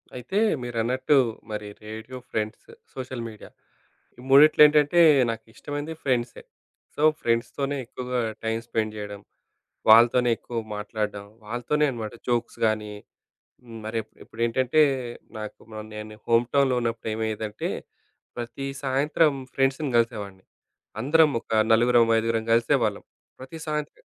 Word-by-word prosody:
అయితే 125 Hz, +10 st, -4 dB, 0.2 s
మీరన్నట్టు, 125 Hz, +4 st, +1 dB, 0.3 s
మరి 105 Hz, -1 st, -4 dB, 0.2 s
రేడియో, 110 Hz, +4 st, -8 dB
ఫ్రెండ్స్, 110 Hz, +1 st, -3 dB, 0.3 s
సోషల్ 130 Hz, -2 st, -6 dB
మీడియా. 110 Hz, -2 st, -11 dB, 0.7 s
ఈ -, -, -10 dB
మూడిట్లో 145 Hz, +4 st, +7 dB
ఏంటంటే 150 Hz, +3 st, +3 dB, 0.3 s
నాకిష్టమైంది 145 Hz, +7 st, -6 dB
ఫ్రెండ్సే. 125 Hz, -3 st, -1 dB, 0.5 s
సో, 150 Hz, -, -2 dB, 0.2 s
ఫ్రెండ్స్‌‌తోనే 125 Hz, +5 st, -1 dB
ఎక్కువగా 125 Hz, +1 st, -4 dB, 0.3 s
టైమ్ 115 Hz, 0 st, -1 dB
స్పెండ్ 110 Hz, -2 st, -1 dB
జేయడం, 105 Hz, -1 st, -7 dB, 0.7 s
వాళ్ళతోనే 120 Hz, +2 st, +6 dB
ఎక్కువ 120 Hz, -1 st, -5 dB, 0.2 s
మాట్లాడం, 105 Hz, -1 st, -4 dB, 0.2 s
వాళ్ళతోనే 120 Hz, +7 st, 0 dB
అనమాట 115 Hz, -3 st, -6 dB, 0.2 s
జోక్స్‌ 120 Hz, -1 st, -1 dB
గాని, 110 Hz, -1 st, 0 dB, 0.7 s
హ్మ్. 115 Hz, -2 st, -10 dB
మరిప్పు 110 Hz, 0 st, -4 dB
ఇప్పుడేంటంటే, 125 Hz, +6 st, +2 dB, 0.6 s
నాకు 105 Hz, -1 st, -7 dB
మ 110 Hz, -, -5 dB
నేను 105 Hz, 0 st, -8 dB
హోమ్‌టౌన్‌లో 125 Hz, +3 st, +3 dB
ఉన్నప్పుడు 115 Hz, -1 st, -2 dB
ఏమైయ్యేదంటే, 110 Hz, -1 st, -3 dB, 0.7 s
ప్రతీ 120 Hz, +3 st, -5 dB, 0.2 s
సాయంత్రం 145 Hz, +3 st, +2 dB, 0.2 s
ఫ్రెండ్స్‌ని 135 Hz, +1 st, +1 dB
గలిసేవాన్ని. 105 Hz, -5 st, -2 dB, 0.6 s
అందరం 155 Hz, +4 st, +4 dB
ఒక -, -, -18 dB, 0.2 s
నలుగురం, 120 Hz, +1 st, +5 dB
ఐదుగురం 115 Hz, 0 st, -1 dB
గలిసేవాళ్ళం. 115 Hz, 0 st, +1 dB, 0.4 s
ప్రతీ 130 Hz, +5 st, -9 dB
సాయంత్రం 150 Hz, -, -4 dB
120 Hz, 110 wpm, -25 LUFS, 110-135 Hz, 0.7 s, మూడిట్లో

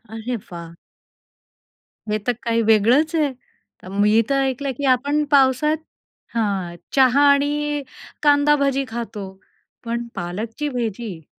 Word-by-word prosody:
अरे 235 Hz, +2 st, -3 dB, 0.2 s
वाह! 170 Hz, -1 st, -9 dB, 1.3 s
हे 210 Hz, -, +1 dB
तर -, -, +4 dB
काही 230 Hz, -1 st, +1 dB
वेगळंच 235 Hz, +9 st, +3 dB
आहे. 295 Hz, -4 st, +1 dB, 0.5 s
अ, -, -, -11 dB
मी 210 Hz, +2 st, +5 dB
तर 275 Hz, 0 st, +2 dB
ऐकलं 270 Hz, +1 st, -1 dB
की 285 Hz, -, -3 dB
आपण 285 Hz, +3 st, +2 dB
पावसात 285 Hz, +2 st, +4 dB, 0.6 s
हां. 195 Hz, -6 st, -1 dB, 0.2 s
चहा 265 Hz, 0 st, +5 dB
आणि 290 Hz, +1 st, 0 dB, 0.4 s
कांदा 290 Hz, 0 st, +5 dB
भजी 275 Hz, 0 st, 0 dB
खातो, 225 Hz, -3 st, -5 dB, 0.6 s
पण 235 Hz, 0 st, -3 dB
पालकची 220 Hz, +11 st, -4 dB
भजी? 225 Hz, -, -4 dB
250 Hz, 120 wpm, -21 LUFS, 220-285 Hz, 1.3 s, मी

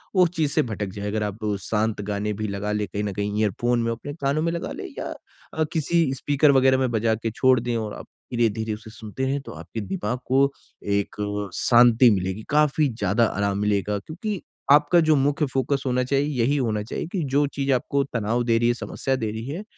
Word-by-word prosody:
वो 185 Hz, -, +6 dB
उस 175 Hz, -, +3 dB
चीज़ 155 Hz, -4 st, +1 dB
से 155 Hz, -, +3 dB
भटक 110 Hz, -3 st, -3 dB
जाए। 100 Hz, 0 st, -5 dB
अगर 105 Hz, +1 st, -1 dB
आप 105 Hz, 0 st, -4 dB, 0.2 s
शांत 110 Hz, +1 st, -1 dB
गाने 105 Hz, +1 st, -2 dB
भी 110 Hz, +1 st, -3 dB
लगा 100 Hz, +1 st, -3 dB
ले, 105 Hz, 0 st, 0 dB
कहीं 105 Hz, +1 st, -3 dB
न 100 Hz, -1 st, -2 dB
कहीं 105 Hz, +2 st, -2 dB
ईयरफ़ोन 120 Hz, +4 st, +1 dB
में 115 Hz, -, 0 dB
अपने 120 Hz, +5 st, -6 dB
कानों 145 Hz, 0 st, -1 dB
में 165 Hz, +1 st, 0 dB
लगा 170 Hz, 0 st, -4 dB
ले -, -, -6 dB
या -, -, -4 dB, 0.4 s
अ, 160 Hz, -, +1 dB
किसी 160 Hz, -2 st, +1 dB
स्पीकर 145 Hz, +2 st, +3 dB
वग़ैरह 130 Hz, -1 st, +4 dB
में 130 Hz, -1 st, +1 dB
बजा 110 Hz, 0 st, +1 dB
के 115 Hz, +1 st, -3 dB
छोड़ 130 Hz, +2 st, +3 dB
दें 120 Hz, 0 st, -2 dB
और 110 Hz, -2 st, -4 dB
आप -, -, -9 dB, 0.3 s
धीरे-धीरे 110 Hz, -2 st, 0 dB
उसे 110 Hz, +1 st, -9 dB
सुनते 110 Hz, +3 st, -5 dB
हैं 140 Hz, +1 st, -1 dB
तो -, -, -10 dB
आपके 115 Hz, -, -7 dB
दिमाग 175 Hz, -, -3 dB
को 135 Hz, +2 st, +3 dB, 0.5 s
एक 100 Hz, -, -3 dB, 0.4 s
शांति 120 Hz, 0 st, +6 dB
मिलेगी। 95 Hz, +1 st, -1 dB
काफ़ी 150 Hz, 0 st, +3 dB
ज़्यादा 110 Hz, 0 st, +1 dB
आराम 100 Hz, -2 st, -1 dB
मिलेगा 105 Hz, 0 st, 0 dB
क्योंकि 185 Hz, -, -5 dB, 0.3 s
आपका 150 Hz, +4 st, +6 dB
जो 155 Hz, -, +6 dB
मुख्य 145 Hz, +2 st, +2 dB
फ़ोकस 135 Hz, +1 st, 0 dB
होना 125 Hz, -1 st, +1 dB
चाहिए 140 Hz, +2 st, +1 dB
यही 135 Hz, +5 st, +2 dB
होना 110 Hz, -6 st, 0 dB
चाहिए 110 Hz, -, -4 dB
कि 185 Hz, -5 st, -1 dB
जो 145 Hz, +1 st, +4 dB
चीज़ 140 Hz, 0 st, 0 dB
आपको 140 Hz, +2 st, +1 dB
तनाव 115 Hz, -2 st, -1 dB
दे 115 Hz, -1 st, +2 dB
रही 120 Hz, +1 st, +2 dB
है, 120 Hz, -, +3 dB
समस्या 135 Hz, +2 st, -2 dB
दे 110 Hz, -5 st, -2 dB
रही 110 Hz, +1 st, -6 dB
है, 165 Hz, +9 st, -5 dB
120 Hz, 220 wpm, -24 LUFS, 105-140 Hz, 0.5 s, वो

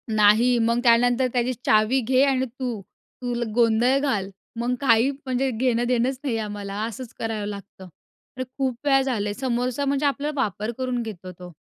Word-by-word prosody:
नाही, 220 Hz, +4 st, +5 dB
मग 235 Hz, +1 st, +2 dB
त्यानंतर 245 Hz, +1 st, +4 dB
त्याची, 250 Hz, 0 st, +1 dB
"चावी 215 Hz, +5 st, +3 dB
घे 260 Hz, +1 st, +4 dB
आणि 265 Hz, -2 st, +1 dB
तू 240 Hz, -6 st, -3 dB, 0.4 s
तुल 240 Hz, -1 st, -2 dB
गोंधळ 235 Hz, +2 st, +3 dB
घाल." 205 Hz, -9 st, -1 dB, 0.3 s
मग 245 Hz, +1 st, 0 dB
काही 235 Hz, 0 st, +4 dB
म्हणजे 265 Hz, -1 st, -2 dB
घेण-देणंच 245 Hz, +2 st, +1 dB
नाहीये 235 Hz, -5 st, -1 dB
आम्हाला, 205 Hz, -2 st, -5 dB
असंच 235 Hz, +2 st, -7 dB
करावं 220 Hz, -2 st, -3 dB
लागतं. 200 Hz, -2 st, -9 dB, 0.5 s
अरे, 255 Hz, -, -2 dB
खूप 265 Hz, -2 st, 0 dB
वेळा 270 Hz, -1 st, +4 dB
झालं 240 Hz, -6 st, -1 dB
आहे. -, -, -2 dB
समोरचा 255 Hz, +1 st, -1 dB
म्हणजे 280 Hz, +1 st, 0 dB
आपला 285 Hz, +1 st, 0 dB
वापर 215 Hz, -3 st, -2 dB
करून 255 Hz, -2 st, -2 dB
घेतो 185 Hz, -4 st, -8 dB
तो. 180 Hz, -1 st, -10 dB
240 Hz, 165 wpm, -24 LUFS, 220-260 Hz, 0.5 s, नाही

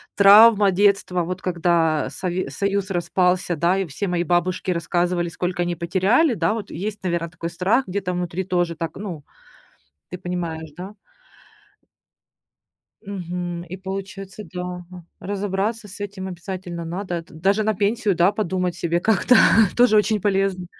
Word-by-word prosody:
травма 205 Hz, 0 st, +7 dB
детства. 195 Hz, -2 st, +2 dB
Вот 185 Hz, +2 st, -5 dB
когда 170 Hz, -3 st, +1 dB
Сове 185 Hz, 0 st, -2 dB
Союз 200 Hz, -1 st, -1 dB
распался, 180 Hz, 0 st, +1 dB
да, 170 Hz, +4 st, +2 dB
и 195 Hz, -, 0 dB
все 165 Hz, +5 st, -4 dB
мои 175 Hz, -1 st, 0 dB
бабушки 180 Hz, +2 st, 0 dB
рассказывали, 175 Hz, 0 st, 0 dB
сколько 175 Hz, +1 st, -3 dB
они 175 Hz, -1 st, -3 dB
потеряли, 195 Hz, -, +2 dB
да. 170 Hz, -2 st, 0 dB
Вот 215 Hz, -3 st, -5 dB
есть, 205 Hz, +5 st, -5 dB
наверно, 170 Hz, -2 st, -1 dB
такой 165 Hz, 0 st, -6 dB
страх 190 Hz, +9 st, +1 dB
где-то 190 Hz, 0 st, -2 dB
внутри 180 Hz, 0 st, -3 dB
тоже 175 Hz, -2 st, -1 dB
так. 165 Hz, 0 st, -5 dB
Ну, 180 Hz, -7 st, -6 dB, 0.9 s
ты 180 Hz, -, -6 dB
понимаешь, 170 Hz, -3 st, -5 dB
да? 190 Hz, +3 st, -7 dB, 2.1 s
Мгм. 175 Hz, -3 st, -5 dB
И 185 Hz, -, -5 dB
получается, 195 Hz, +1 st, -7 dB
да, 180 Hz, -, -3 dB, 0.3 s
ага, 180 Hz, -2 st, -11 dB, 0.2 s
разобраться 205 Hz, +2 st, -2 dB
с 200 Hz, -, -9 dB
этим 195 Hz, -2 st, -5 dB
обязательно 175 Hz, -1 st, -6 dB
надо. 180 Hz, +2 st, -4 dB
Это 165 Hz, -1 st, -6 dB
даже 195 Hz, +6 st, +1 dB
на 215 Hz, 0 st, +1 dB
пенсию, 205 Hz, +1 st, +1 dB
да, 175 Hz, +2 st, +4 dB
подумать 185 Hz, -4 st, -1 dB
себе 170 Hz, 0 st, 0 dB
как-то 220 Hz, +5 st, +4 dB, 0.4 s
тоже 240 Hz, -3 st, +5 dB
очень 210 Hz, 0 st, +2 dB
полезно. 195 Hz, -2 st, 0 dB
185 Hz, 145 wpm, -22 LUFS, 175-200 Hz, 2.1 s, травма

